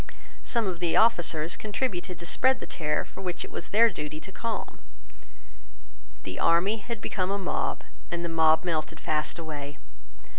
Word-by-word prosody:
Some 235 -2 +1
of 180 -3 -2
the 175 -2 +2
officers 175 -7 +3
contributed 200 -5 -2
to 170 - -8
spread 260 +9 +3
the - - -5
terror 150 -2 -1
which 180 -2 -3
it - - -11
was - - -5
their 230 +2 +6
duty 150 -2 -5
to 190 - -8
calm. 225 +2 -4 1.4
The 95 - -5
army 180 +6 +4
had 225 +1 -6
become 185 -1 -1
a 200 - +1
mob; 190 -2 -1 0.3
and 175 0 -2
the - - 0
mob 160 -1 +4
melted 165 -2 -1
fast 155 +1 -1
away. 145 -3 -6
175 Hz, 160 wpm, -28 LUFS, 160-205 Hz, 1.4 s, their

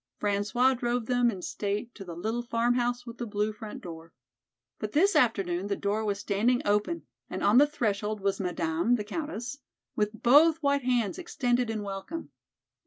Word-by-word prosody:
François 210 +6 +2
drove 240 -1 -1
them 245 0 +3
in 190 -5 -5
state 205 +3 -3
to 200 - -9
the 175 -3 -8
little 220 +7 -2
"Farmhouse 240 +1 0
with 235 -1 -9
the 240 - -3
Blue 210 +1 -1
Front 215 0 -9
Door." 165 -2 -9 0.7
But 215 0 -4
this 390 +7 +4
afternoon 195 -6 +2
the 200 - 0
door 205 +2 -1
was 205 -2 -1
standing 210 +5 +1
open 210 +12 0 0.2
and - - -4
on 210 +5 +6
the 290 - +6
threshold 215 -6 -1
was 195 0 -1
Madame, 175 +3 +1
the 215 - -2
Countess, 280 +1 -5 0.4
with 210 +1 -2
both 300 +6 +6
white 280 -2 +2
hands 240 - +1
extended 245 -8 0
in 215 -2 -2
welcome. 200 +12 -6
220 Hz, 175 wpm, -28 LUFS, 200-245 Hz, 0.7 s, on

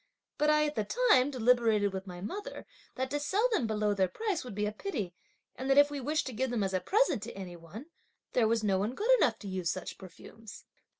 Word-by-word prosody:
But 300 - +3
I 300 0 +4
at 300 - -2
the 215 - -1 0.3
time, 255 +2 +5
deliberated 230 -5 +2
with 190 +1 -5
my 180 -1 -8
mother 410 - -6 0.3
that 260 0 -3
to 290 - 0
sell 390 +11 +1
them 335 - +1
below 210 -1 0
their 190 -2 +2
price 405 - -3
would 245 -5 -8
be 210 0 0
a 210 - -1
pity, 215 - -4 0.4
and 260 +1 -5
that 270 - +4
if 290 0 +6
we 290 - -4
wished 300 +4 0
to 260 - -5
give 260 +4 -1
them 235 -4 -1
as 190 -1 -2
a 185 - +2
present 375 - +2
to - - -8
any 180 -3 -7
one, 170 - -10 0.5
there 235 -3 +3
was 225 0 +1
no 195 -3 +2
one 215 +6 -2
good 445 - +1
enough 225 - +3
to 205 - -9
use 185 -3 -2
such - - -5
perfumes. 200 +4 -12
230 Hz, 240 wpm, -31 LUFS, 200-290 Hz, 0.5 s, if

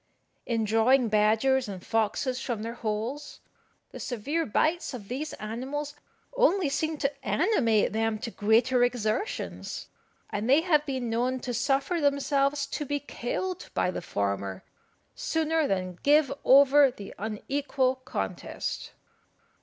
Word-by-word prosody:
In 230 -2 0
drawing 225 +3 +3
badgers 220 +5 +3
and 190 -3 -7
foxes 225 +4 0
from 230 -4 -3
their 230 +1 -4
holes, 230 +5 -4 0.5
the - - -9
severe 285 +8 -2
bites 310 +6 0
of 205 -5 -10
these 290 +5 -4
animals 265 +7 -4 0.4
only 395 - +3
seem 315 +2 -1
to 275 0 0
animate 230 - +2
them 225 0 0
to 230 +2 -5
greater 235 +5 +3
exertions; 245 - -2 0.4
and 210 +4 -2
they 280 +4 +6
have 305 -4 +2
been 255 -4 -2
known 250 +3 0
to 245 - -4
suffer 275 - 0
themselves 280 0 +1
to 295 - -4
be 290 0 -2
killed 350 +7 -4
by 180 - +1
the - - -5
former 100 - -3 0.5
sooner 320 - 0
than 185 -2 -2
give 295 -1 +4
over 280 +1 +7
the 205 -6 -10
unequal 260 +5 -1
contest. 260 - -5
255 Hz, 130 wpm, -28 LUFS, 220-290 Hz, 0.5 s, over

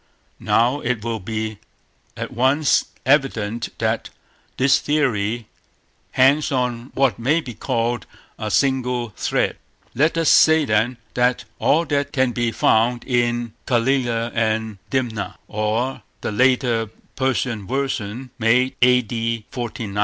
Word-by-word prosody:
Now 125 +5 +2
it 125 -5 -2
will 115 -1 -2
be 110 +1 -4 0.6
at - - -5
once 135 +5 +2 0.2
evident 120 -5 +1
that - - -1 0.5
this 130 0 +4
theory 120 -7 0 0.7
hangs 140 +4 +4
on 125 -2 -1
what 135 -3 +2
may 140 +8 +2
be 130 -7 -7
called 115 +2 -2 0.3
a 110 - -3
single 125 -1 +1
thread. - - 0 0.4
Let 155 +5 +2
us 165 -1 +1
say, 160 -1 +6
then, 110 +2 +1 0.2
that 125 0 +1
all 165 +4 +3
that 145 -1 -1
can 130 -3 +2
be 120 -1 -1
found 120 +2 +2
in 120 -2 0
Calila 120 -2 +1
and 110 -2 -1
Dimna, 110 -7 -2
or 110 +5 -1 0.2
the - - -3
later 120 -1 +2 0.3
Persian 125 -6 -1
version, 125 -2 -3
made 125 +4 +2
A.D. 115 -2 +2
120 Hz, 120 wpm, -21 LUFS, 115-130 Hz, 0.7 s, say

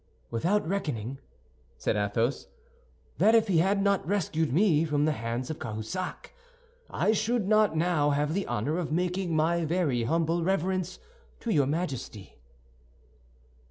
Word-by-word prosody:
"Without 170 - +1
reckoning," 135 - -3 0.6
said - - -1
Athos, 110 +5 -1 0.7
"that 215 +6 +5
if 225 -1 +4
he 180 -5 +3
had 195 +3 +2
not 200 -1 +2
rescued 165 -6 0
me 165 -1 +3
from 150 -2 +1
the 155 - +2
hands 120 +1 -3
of 155 - -6
Cahusac, 110 +10 -5 0.6
I - - +1
should 220 -1 0
not 215 -5 +3
now 160 -3 +2
have 145 +1 0
the 195 +2 -2
honor 150 +11 -1
of 165 -4 -3
making 180 +1 -1
my 165 +2 +2
very 155 -8 0
humble 165 +4 +1
reverence 185 0 -1 0.4
to 235 - -2
your 145 -8 +3
Majesty." 135 - -4
165 Hz, 140 wpm, -28 LUFS, 140-190 Hz, 0.7 s, that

